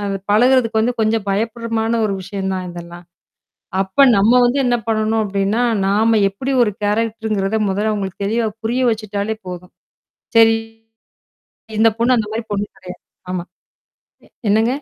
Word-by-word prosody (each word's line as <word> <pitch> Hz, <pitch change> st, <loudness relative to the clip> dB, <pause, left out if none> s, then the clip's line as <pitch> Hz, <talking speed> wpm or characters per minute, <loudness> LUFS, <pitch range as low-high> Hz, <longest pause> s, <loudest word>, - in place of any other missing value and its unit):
அந்த 195 Hz, -1 st, -2 dB
பழகுறதுக்கு 235 Hz, -1 st, +3 dB
வந்து, 240 Hz, +3 st, +1 dB
கொஞ்சம் 220 Hz, -1 st, 0 dB
பயப்பட்றமான 225 Hz, +2 st, -1 dB
ஒரு 200 Hz, -, -2 dB
விஷயம் 195 Hz, 0 st, -4 dB
தான் 185 Hz, -1 st, -4 dB
இதெல்லாம். 175 Hz, 0 st, -10 dB, 0.8 s
அப்ப 195 Hz, +9 st, +3 dB
நம்ம 215 Hz, +5 st, +4 dB
வந்து 245 Hz, +3 st, +2 dB
என்ன 245 Hz, -, +2 dB
பண்ணணும் 220 Hz, 0 st, +1 dB
அப்பிடின்னா, 200 Hz, +3 st, 0 dB, 0.2 s
நாம 220 Hz, +3 st, +3 dB
எப்படி 255 Hz, +8 st, -5 dB
ஒரு 210 Hz, -, 0 dB
கேரக்டர்ங்கிறத 220 Hz, -1 st, -1 dB
முதல்ல 210 Hz, +3 st, 0 dB
அவுங்களுக்கு, 195 Hz, -2 st, -4 dB
தெளிவா 225 Hz, +3 st, 0 dB, 0.2 s
புரிய 245 Hz, +3 st, 0 dB
வச்சுட்டாலே 215 Hz, 0 st, -3 dB
போதும். 180 Hz, 0 st, -8 dB, 0.6 s
செரி. 225 Hz, 0 st, +6 dB, 1.2 s
இந்த 225 Hz, -, +6 dB
பொண்ணு 245 Hz, +2 st, +3 dB
அந்தமாரி 220 Hz, 0 st, -3 dB
பொண்ணு 205 Hz, 0 st, -1 dB
கெடையாது. 180 Hz, -1 st, -11 dB, 0.3 s
ஆமா, 175 Hz, -2 st, -3 dB, 1.1 s
என்னங்க? 220 Hz, +3 st, +3 dB
215 Hz, 135 wpm, -18 LUFS, 195-230 Hz, 1.2 s, செரி